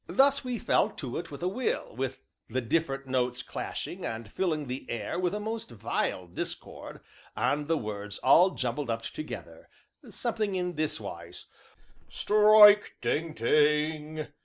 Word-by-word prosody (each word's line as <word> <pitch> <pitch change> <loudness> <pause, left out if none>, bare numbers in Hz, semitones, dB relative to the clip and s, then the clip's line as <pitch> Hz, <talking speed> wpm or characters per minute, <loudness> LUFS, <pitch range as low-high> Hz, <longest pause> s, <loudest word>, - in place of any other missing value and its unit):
Thus 275 +9 +4
we 250 -2 -3
fell - - +2
to 125 -4 -5
it 170 0 -7
with 145 +2 -8
a - - +1
will, 210 - -2 0.5
the 130 +3 -1
different 135 +2 -1
notes 125 -1 -1
clashing, - - -5
and 110 -1 -5
filling 160 -6 -1
the 130 0 -6
air 115 +7 -3
with 180 -1 +1
a - - -2
most 220 +2 -4
vile 110 -4 -2
discord, 85 +1 -7 0.3
and 140 +6 0
the 165 0 +2
words 105 -3 -5
all 180 +3 +6
jumbled 130 -3 -3
up 115 0 -2
together, 310 - -8 0.4
something 220 -5 -2
in 180 -1 -1
this 155 -1 -1
wise: - - -9 0.6
"Strike! 210 0 +6
ding! 155 +7 -1
ding! 150 +4 +1
150 Hz, 145 wpm, -29 LUFS, 125-190 Hz, 0.6 s, all